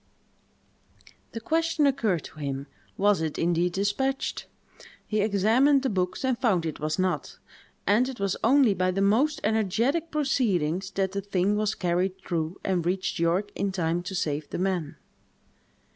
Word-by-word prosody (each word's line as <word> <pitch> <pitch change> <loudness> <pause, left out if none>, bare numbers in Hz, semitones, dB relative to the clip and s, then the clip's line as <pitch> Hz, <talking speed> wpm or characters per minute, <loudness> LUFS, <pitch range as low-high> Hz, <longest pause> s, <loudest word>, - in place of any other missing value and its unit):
The 230 - -4
question 325 +4 +1
occurred 220 - +1
to 155 - -12
him, 140 -1 -3 0.3
was 205 -3 +3
it 160 -2 -2
indeed 175 +1 +1
despatched? 235 +8 -1 0.6
He 215 -1 0
examined 225 +8 +3
the 265 - 0
books 185 +5 -1
and 255 -2 0
found 200 -10 +2
it 160 - -4
was 155 0 -2
not; 185 -1 -1 0.5
and 235 +6 +3
it 260 - -8
was 195 -1 0
only 255 -2 +5
by 185 0 0
the 195 +2 0
most 275 +10 +2
energetic 225 - +1
proceedings 195 - 0
that 190 -1 0
the 200 +1 -3
thing 200 0 0
was 215 0 0
carried 180 +1 0
through, 170 -1 -3
and 185 -3 0
reached 185 +1 -1
York 180 +5 +1
in 200 0 -1
time 175 -2 -1
to 185 +2 -6
save 150 -3 -2
the - - -4
men. 180 -5 -1
195 Hz, 160 wpm, -26 LUFS, 175-230 Hz, 0.6 s, only